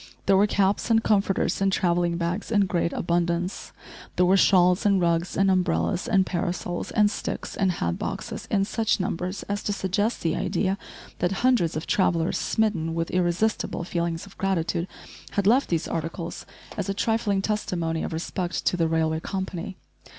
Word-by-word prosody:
There 195 - +4
were 200 +2 +5
caps 200 +1 +1
and 225 -1 +4
comforters 195 -2 +1
and 195 0 +3
travelling 175 -2 +1
bags 175 +4 -2
in 205 -2 +4
great 170 -2 0
abundance. 175 +1 -1 0.4
There 180 - +4
were 185 +2 +5
shawls 180 0 +4
and 200 -3 +3
rugs, 170 0 0
and 195 0 +4
umbrellas 185 0 +1
and 190 -3 +3
parasols, 175 0 -3
and 210 -1 +3
sticks - - -5
and 190 -2 +1
hat 85 - -2
boxes - - -5
in 195 -1 +2
such 220 +1 0
numbers 185 +1 -3
as 205 0 -3
to - - -2
suggest 205 +3 -1
the 165 -2 +1
idea 195 0 -1 0.4
that 175 - +1
hundreds 225 -12 +3
of 155 - -4
travellers, 170 -3 +1
smitten 175 -7 0
with 165 0 -2
irresistible 180 +2 0
feelings 170 0 -2
of 200 - -17
gratitude, 175 -2 0 0.5
had 200 - 0
left 245 +7 +4
these 165 -3 0
articles 165 +1 -4 0.3
as - - -2
a 195 - -1
trifling 210 -3 0
testimony 170 -6 -1
of - - -3
respect 175 +2 -3
to - - +2
the 165 -2 +1
railway 160 -1 +1
company. 190 +1 -5
185 Hz, 170 wpm, -25 LUFS, 170-200 Hz, 0.5 s, were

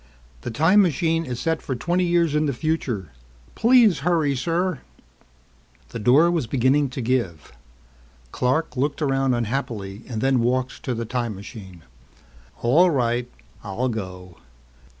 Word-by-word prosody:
"The - - -5
time 160 - +4
machine 165 -2 +1
is 125 -3 -5
set 160 +3 -1
for 130 - -4
twenty 175 +8 0
years 170 -3 +2
in 150 0 +1
the 140 - 0
future. 120 - -2 0.4
Please 230 - +4
hurry, 155 -2 +1
sir!" 170 +4 -1 1.1
The - - -6
door 140 +10 +4
was 160 -8 -1
beginning 135 +4 +2
to 130 +1 -5
give. 115 - -2 0.8
Clark 130 +6 0
looked 145 +4 -1
around 135 -2 +1
unhappily 110 -4 -3
and 115 -3 -4
then 135 +2 +2
walked 125 +2 -1
to 125 - -1
the 115 0 -3
time 120 -2 -3
machine. 95 -4 -11 0.8
"All 160 +10 +5
right, 120 -4 0 0.3
I'll 105 +6 -2
go. 90 -5 -7
130 Hz, 140 wpm, -23 LUFS, 115-160 Hz, 1.1 s, All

